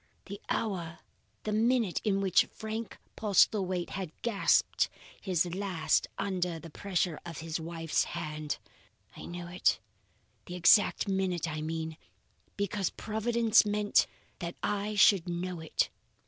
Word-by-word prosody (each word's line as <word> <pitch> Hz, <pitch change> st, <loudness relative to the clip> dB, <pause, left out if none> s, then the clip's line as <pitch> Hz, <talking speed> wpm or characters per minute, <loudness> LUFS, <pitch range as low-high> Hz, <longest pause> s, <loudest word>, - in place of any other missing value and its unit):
The 200 Hz, +1 st, -8 dB
hour, 175 Hz, -7 st, -2 dB, 0.5 s
the 215 Hz, -, -2 dB
minute 225 Hz, -2 st, +2 dB
in 195 Hz, -2 st, +1 dB
which 190 Hz, -2 st, +4 dB
Frank 220 Hz, -1 st, -5 dB, 0.2 s
Postlethwaite 190 Hz, -3 st, +2 dB
had 185 Hz, -4 st, -4 dB
gasped 225 Hz, -4 st, +2 dB, 0.3 s
his 180 Hz, -4 st, +1 dB
last 180 Hz, -5 st, +1 dB
under 180 Hz, -3 st, -1 dB
the 165 Hz, 0 st, -10 dB
pressure 180 Hz, -3 st, -1 dB
of 170 Hz, -3 st, -7 dB
his 165 Hz, 0 st, -3 dB
wife's 165 Hz, -1 st, -1 dB
hand! 155 Hz, -3 st, -4 dB, 0.6 s
I -, -, -9 dB
knew 175 Hz, 0 st, -6 dB
it 180 Hz, +1 st, +2 dB, 0.7 s
the 180 Hz, -, -6 dB
exact 195 Hz, +4 st, +5 dB
minute 190 Hz, -3 st, 0 dB
I 155 Hz, -1 st, -3 dB
mean 160 Hz, 0 st, -4 dB, 0.6 s
because 200 Hz, -1 st, 0 dB
Providence 225 Hz, +1 st, +2 dB
meant 210 Hz, 0 st, +2 dB, 0.3 s
that 170 Hz, -1 st, -5 dB
I 205 Hz, +1 st, -1 dB
should 200 Hz, -4 st, +5 dB
know 175 Hz, 0 st, -3 dB
it. 160 Hz, -1 st, 0 dB
185 Hz, 130 wpm, -30 LUFS, 170-205 Hz, 0.7 s, exact